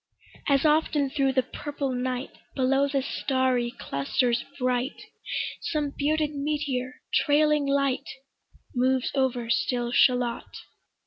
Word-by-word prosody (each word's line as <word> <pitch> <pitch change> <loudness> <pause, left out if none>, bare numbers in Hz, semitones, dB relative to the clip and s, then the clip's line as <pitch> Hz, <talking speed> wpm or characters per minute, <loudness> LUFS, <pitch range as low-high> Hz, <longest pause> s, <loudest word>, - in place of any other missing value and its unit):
As 280 0 +3
often 300 -2 +2
thro' 275 -2 +2
the 260 -1 +2
purple 285 -1 -4
night, 250 +1 -2 0.2
Below 270 +1 +3
the 275 -1 0
starry 260 -3 0
clusters 235 - -1
bright, 255 +1 -1 0.6
Some 295 -3 -2
bearded 300 +1 +1
meteor, 280 -3 -2
trailing 300 -1 +3
light, 275 -2 +1 0.6
Moves 260 0 +1
over 255 -3 0
still 240 +6 0
Shalott. 250 -2 +2
265 Hz, 110 wpm, -26 LUFS, 250-285 Hz, 0.6 s, As